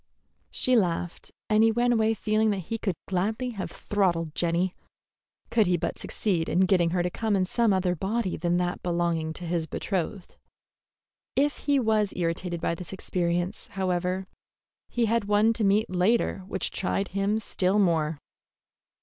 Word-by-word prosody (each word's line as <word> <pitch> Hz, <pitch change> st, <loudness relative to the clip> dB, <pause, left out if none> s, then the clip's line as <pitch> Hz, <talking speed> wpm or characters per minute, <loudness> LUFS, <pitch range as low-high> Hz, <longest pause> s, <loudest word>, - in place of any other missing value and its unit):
She 255 Hz, -, +1 dB
laughed, 175 Hz, -5 st, -1 dB, 0.2 s
and 215 Hz, 0 st, +4 dB
he 225 Hz, -, +5 dB
went 240 Hz, +2 st, +2 dB
away 225 Hz, -1 st, +2 dB
feeling 215 Hz, 0 st, +1 dB
that 205 Hz, -, 0 dB
he 225 Hz, +4 st, -3 dB
could 195 Hz, -5 st, -1 dB
gladly 215 Hz, +7 st, -1 dB
have 200 Hz, -5 st, -5 dB
throttled 170 Hz, -6 st, 0 dB
Jenny, 175 Hz, +2 st, +1 dB, 0.8 s
could 220 Hz, -4 st, +3 dB
he 180 Hz, -1 st, +3 dB
but -, -, -3 dB
succeed 175 Hz, -6 st, -1 dB
in 180 Hz, -, +2 dB
getting 180 Hz, -2 st, +3 dB
her 175 Hz, +1 st, 0 dB
in 190 Hz, +2 st, 0 dB
some 230 Hz, +3 st, +2 dB
other 185 Hz, -2 st, +1 dB
body 195 Hz, +2 st, -1 dB
than 175 Hz, 0 st, 0 dB
that 175 Hz, 0 st, -1 dB
belonging 170 Hz, -2 st, 0 dB
to 175 Hz, -, -7 dB
his 165 Hz, -1 st, -1 dB
betrothed. 185 Hz, +2 st, -3 dB, 1.0 s
If 290 Hz, +2 st, +2 dB
he 285 Hz, -1 st, +4 dB
was 220 Hz, -4 st, +1 dB
irritated 175 Hz, 0 st, -2 dB
by 170 Hz, -, 0 dB
this 175 Hz, +2 st, -7 dB
experience, 175 Hz, +1 st, -2 dB
however, 185 Hz, 0 st, -1 dB, 0.6 s
he 240 Hz, -1 st, +1 dB
had 230 Hz, -1 st, +1 dB
one 210 Hz, +2 st, +3 dB
to 225 Hz, -, 0 dB
meet 205 Hz, +2 st, +3 dB
later 185 Hz, +4 st, +1 dB
which 190 Hz, -1 st, -2 dB
tried 195 Hz, +1 st, -1 dB
him 200 Hz, +3 st, 0 dB
still 195 Hz, -2 st, 0 dB
more. 165 Hz, -6 st, +2 dB
190 Hz, 160 wpm, -27 LUFS, 175-215 Hz, 1.0 s, he